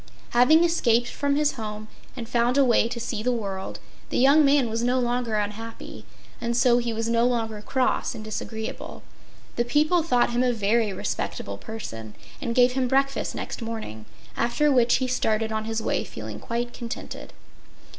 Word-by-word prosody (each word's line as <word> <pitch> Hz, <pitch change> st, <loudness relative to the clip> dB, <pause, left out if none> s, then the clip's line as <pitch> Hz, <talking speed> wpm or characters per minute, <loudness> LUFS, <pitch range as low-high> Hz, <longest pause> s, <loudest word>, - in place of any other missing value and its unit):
Having 255 Hz, +8 st, +5 dB
escaped 240 Hz, -9 st, +2 dB
from 285 Hz, 0 st, -1 dB
his 295 Hz, 0 st, +2 dB
home 215 Hz, -2 st, -6 dB, 0.3 s
and 235 Hz, -2 st, -5 dB
found 240 Hz, +2 st, +1 dB
a 280 Hz, -, +6 dB
way 235 Hz, -2 st, +4 dB
to 235 Hz, 0 st, -5 dB
see 230 Hz, -2 st, -3 dB
the 250 Hz, +3 st, +1 dB
world, 195 Hz, -5 st, -4 dB, 0.3 s
the -, -, -1 dB
young 280 Hz, +4 st, +6 dB
man 280 Hz, -3 st, +4 dB
was 225 Hz, +1 st, -2 dB
no 250 Hz, +2 st, +2 dB
longer 240 Hz, -2 st, -1 dB
unhappy, 215 Hz, +2 st, -5 dB, 0.4 s
and 235 Hz, 0 st, -1 dB
so 245 Hz, -1 st, +4 dB
he 235 Hz, -1 st, -2 dB
was 225 Hz, 0 st, -2 dB
no 230 Hz, 0 st, +2 dB
longer 225 Hz, -3 st, -2 dB
cross 255 Hz, +4 st, 0 dB
and 215 Hz, -, -7 dB
disagreeable. 220 Hz, +1 st, -6 dB, 0.5 s
The 240 Hz, -, +3 dB
people 305 Hz, +8 st, +2 dB
thought 250 Hz, -7 st, +2 dB
him 240 Hz, +1 st, +1 dB
a 250 Hz, -1 st, +2 dB
very 220 Hz, 0 st, +1 dB
respectable 100 Hz, -, -4 dB
person 115 Hz, -, -8 dB, 0.3 s
and 235 Hz, -4 st, -2 dB
gave 250 Hz, 0 st, +5 dB
him 255 Hz, 0 st, 0 dB
breakfast 275 Hz, +2 st, 0 dB
next -, -, -5 dB
morning, 220 Hz, -, -6 dB, 0.3 s
after 290 Hz, +5 st, +2 dB
which 245 Hz, -3 st, +4 dB
he 260 Hz, -, 0 dB
started 220 Hz, -3 st, 0 dB
on 220 Hz, 0 st, -2 dB
his 225 Hz, 0 st, -2 dB
way -, -, 0 dB
feeling 110 Hz, -1 st, -8 dB
quite 240 Hz, +1 st, -3 dB
contented. 235 Hz, -1 st, -7 dB
235 Hz, 175 wpm, -25 LUFS, 220-255 Hz, 0.5 s, a